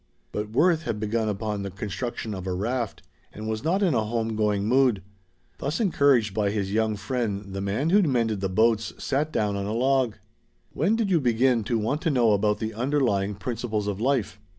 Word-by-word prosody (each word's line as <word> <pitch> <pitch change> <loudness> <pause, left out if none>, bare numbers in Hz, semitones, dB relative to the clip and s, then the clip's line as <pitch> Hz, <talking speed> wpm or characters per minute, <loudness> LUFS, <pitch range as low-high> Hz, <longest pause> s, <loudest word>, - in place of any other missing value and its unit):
But 105 0 -3
Worth 160 +8 +3
had 110 -10 -3
begun 110 +1 -1
upon 105 0 -3
the 100 - -4
construction 105 +3 -4
of 95 -1 -6
a 90 - -1
raft, 115 +4 -2 0.3
and 110 +1 -7
was 110 +1 -3
not 185 +6 +1
in 175 -6 +3
a 110 - +2
home 115 0 -2
going 105 -2 +1
mood. 125 -5 +3 0.6
Thus 145 +3 -2
encouraged 140 - +3
by 105 -1 +1
his 100 -1 -2
young 110 0 +1
friend 100 -2 -3
the 95 - -3
man 105 +11 -1
who 205 +2 +6
mended 115 - +1
the 95 - -1
boats 110 +3 +2
sat 145 +3 -1
down 105 -6 0
on 100 0 -3
a 105 - -2
log. 130 -1 +2 0.6
"When 185 +10 +2
did 220 -4 0
you 170 - +4
begin 120 -1 +2
to 115 - 0
want 115 +8 -1
to - - +1
know 120 -6 +3
about 105 +1 +2
the 110 0 -4
'underlying 115 -5 0
principles 110 +1 -3
of 100 0 -3
life'?" 125 -5 0
110 Hz, 200 wpm, -25 LUFS, 105-130 Hz, 0.6 s, who